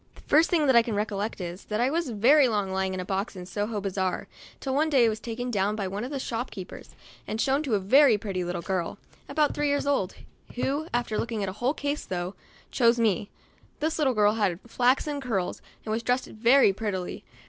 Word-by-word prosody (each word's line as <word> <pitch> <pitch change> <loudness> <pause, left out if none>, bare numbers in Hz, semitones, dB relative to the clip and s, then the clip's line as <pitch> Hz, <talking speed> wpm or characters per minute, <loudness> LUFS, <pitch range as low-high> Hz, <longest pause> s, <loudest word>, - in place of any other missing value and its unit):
The - - -15
first 315 +3 +3
I 285 -8 +5
can 230 -2 -3
recollect 210 +1 -2
is, 175 +1 -6
that 210 0 -2
I 250 +3 +2
was 330 -2 -1
very 255 +6 +5
long 205 -4 -1
lying 190 0 -1
in - - -4
a 180 - -4
box 195 +3 -2
in 180 -1 -7
Soho 205 +3 -3
bazaar, 190 -2 -2 0.3
till 265 - -3
one 305 +3 +2
day 265 -5 +5
I - - +4
was 215 0 -3
taken 245 +2 -4
down 205 -1 +1
by 200 -3 -2
one 200 +3 -4
of 250 - -4
the 285 - -3
shopkeepers, 225 -6 -6 0.3
and 220 - -3
shown 270 +4 +2
to 265 -8 0
a - - +2
very 245 +4 +5
pretty 195 -3 -3
little 175 -1 -4
girl, 185 -3 -2 0.3
abont 300 -1 +2
three 295 - 0
years 285 0 +1
old, 275 -10 0 0.4
who, 280 +5 -1
after 240 -3 -1
looking 220 -4 -2
a - - -2
whole 245 +9 -1
case 285 +1 -3
through', 180 0 -3 0.4
chose 235 -1 +4
me. 210 -3 +1 0.5
This 315 +2 -1
little 265 -5 +2
girl 210 0 +4
had 200 -6 0
flaxen 260 +5 +1
curls, 220 -9 -2 0.2
and 215 - -3
was 225 +1 0
dressed 250 +2 0
very 230 0 +4
prettily. 190 -3 -4
225 Hz, 215 wpm, -27 LUFS, 195-265 Hz, 0.5 s, I